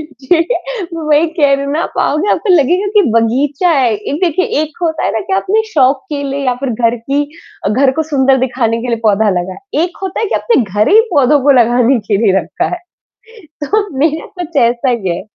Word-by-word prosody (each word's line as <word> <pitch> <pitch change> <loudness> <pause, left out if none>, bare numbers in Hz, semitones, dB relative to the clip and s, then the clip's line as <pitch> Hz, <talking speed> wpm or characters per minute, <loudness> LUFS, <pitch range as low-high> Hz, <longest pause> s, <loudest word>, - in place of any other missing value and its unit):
जी, 300 +1 -1 0.6
वही 310 -1 +1
कह 295 -3 +1
रही 275 0 -2
हूँ 280 - -3
ना, 315 +3 -1 0.2
आओगे 310 +8 0
आप - - -2
लगेगा 355 +4 +3
कि 415 - +6
बगीचा 270 +9 +1
है। 265 -7 +2
एक 210 +9 -5
देखिए, 360 +2 0 0.2
एक 310 +2 -8
होता 320 -2 -1
है - - +1
ना 225 - -1
कि 195 - -6
आपने 415 - +1
शौक 270 -5 +1
के 285 - -3
लिए 275 0 -3
या 250 - +1
फ़िर 270 - -1
घर 230 0 +2
की 275 +5 -1 0.4
अ, - - +2
घर 260 +5 +2
को - - +3
सुंदर 270 -2 +3
दिखाने 230 -3 -1
के 250 - -5
लिए 235 - 0
पौधा 215 -1 +2
लगा। 185 +1 -7 0.3
एक 350 0 -3
होता 380 -1 -3
है 445 - 0
कि - - -2
आपने 460 - +1
घर 210 +1 0
ही 435 - +6
पौधों 285 0 +3
को 285 - +3
लगाने 240 +2 +2
के 205 - +2
लिए 195 -2 +3
रखा - - -3
है। - - -7 0.9
तो 415 +7 0
मेरा 315 +2 0
तो - - -17
कुछ 335 -1 -11
ऐसा 235 +2 +1
ही 225 -7 -1
है। - - -6
275 Hz, 225 wpm, -14 LUFS, 235-320 Hz, 0.9 s, कि